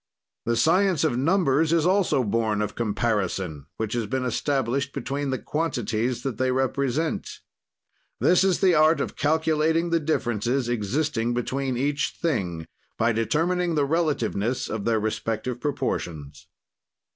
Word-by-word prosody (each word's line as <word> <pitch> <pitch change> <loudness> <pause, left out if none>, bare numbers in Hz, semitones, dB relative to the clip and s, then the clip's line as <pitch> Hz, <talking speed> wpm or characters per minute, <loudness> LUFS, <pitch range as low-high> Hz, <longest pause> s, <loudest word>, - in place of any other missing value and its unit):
"The 115 - +1
science 175 - +3
of 150 -6 +1
numbers 155 +1 +2
is 165 -1 +3
also 180 -8 +2
born 110 -1 0
of 105 - -4
comparison, 100 - -2
which 110 -2 -3
has 115 -3 -1
been 130 +3 -2
established 135 +1 -1
between 140 0 -3
the 130 - 0
quantities 120 -4 -2
that 130 -5 -4
they 130 0 +2
represent. 135 +4 -1 0.9
"This 180 +1 +4
is 190 -2 +2
the 185 -2 +5
art 155 0 +4
of - - -3
calculating 160 +2 +1
the 165 - +3
differences 120 -4 -1
existing 120 +1 -1
between 130 +1 -2
each 145 +2 -1
thing, 95 - -1 0.3
by 115 +1 +2
determining 165 +10 0
the 145 -2 +2
relativeness 135 -7 0
of 110 -2 -3
their 115 -1 +2
respective 115 +3 -3
proportions. 80 - -3
130 Hz, 135 wpm, -25 LUFS, 115-155 Hz, 0.9 s, the